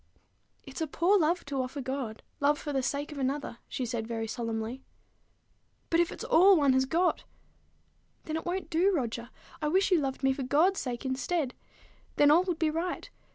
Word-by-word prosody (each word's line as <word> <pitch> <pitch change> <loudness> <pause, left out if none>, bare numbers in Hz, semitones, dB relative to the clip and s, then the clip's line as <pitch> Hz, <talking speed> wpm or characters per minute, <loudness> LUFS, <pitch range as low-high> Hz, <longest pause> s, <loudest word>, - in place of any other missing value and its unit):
"It's 270 +3 -8
a 320 - 0
poor 360 +7 +3
love 340 +2 +1
to 280 -2 -2
offer 255 +3 -5
God, 260 -4 -4 0.2
love 290 +1 +3
for 295 -2 -5
the 270 - +1
sake 285 +3 -2
of 295 - -7
another," 270 -2 -2
she 265 -2 -3
said 230 -2 -3
very 225 -1 -3
solemnly. 225 +2 -4 1.1
"But 330 - +3
if 345 - +2
it's - - -7
all 380 +3 +6
one 280 -3 +4
has 260 0 +3
got?" 340 +6 +1 1.0
"Then 310 - -4
it 320 - -3
won't 370 +2 -3
do, 350 +5 +3
Roger. 240 - -2 0.3
I 300 - 0
wish 380 +5 +2
you 360 - +5
loved 270 -1 -3
me 270 0 +4
for 270 - -5
God's 315 +9 +3
sake 245 -1 -4
instead. 265 +1 -1 0.6
Then 290 0 +5
all 330 +4 +6
would 355 -4 -1
be 315 -2 +1
right. 335 +3 -3
285 Hz, 195 wpm, -29 LUFS, 260-330 Hz, 1.1 s, all